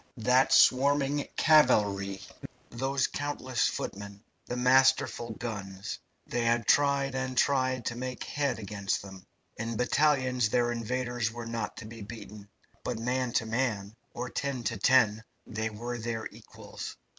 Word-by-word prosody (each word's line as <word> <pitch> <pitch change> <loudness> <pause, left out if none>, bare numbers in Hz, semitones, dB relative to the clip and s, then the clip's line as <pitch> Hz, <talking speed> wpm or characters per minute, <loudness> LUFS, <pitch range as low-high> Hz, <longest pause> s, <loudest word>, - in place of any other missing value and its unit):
That 125 +3 +3
swarming 140 +2 +4
cavalry, 100 -10 +4 0.5
those 135 +3 0
countless 130 -4 -1
footmen, 100 +1 -5 0.2
the 125 - -3
masterful 130 -1 +3
guns 95 - -5 0.3
they 120 -1 -2
had 115 -1 +2
tried 140 0 +3
and 130 -1 -3
tried 130 -4 +2
to 120 - -2
make 130 +1 -5
head 145 -3 -1
against 100 -2 -3
them. 95 -1 -11 0.3
In 115 0 -3
battalions 130 -2 +2
their 120 +1 +2
invaders 120 0 -2
were 120 0 -7
not 115 -2 -4
to 115 - -8
be 115 +1 -10
beaten, 105 -1 -10 0.3
but - - -2
man 125 +2 -1
to 115 - +1
man, 110 -3 -2 0.2
or 125 +1 -4
ten 140 -3 -3
to 115 0 -2
ten, 110 -1 +4 0.2
they 110 0 -3
were 120 +3 -5
their 115 0 -3
equals. - - -9
120 Hz, 140 wpm, -29 LUFS, 110-130 Hz, 0.5 s, swarming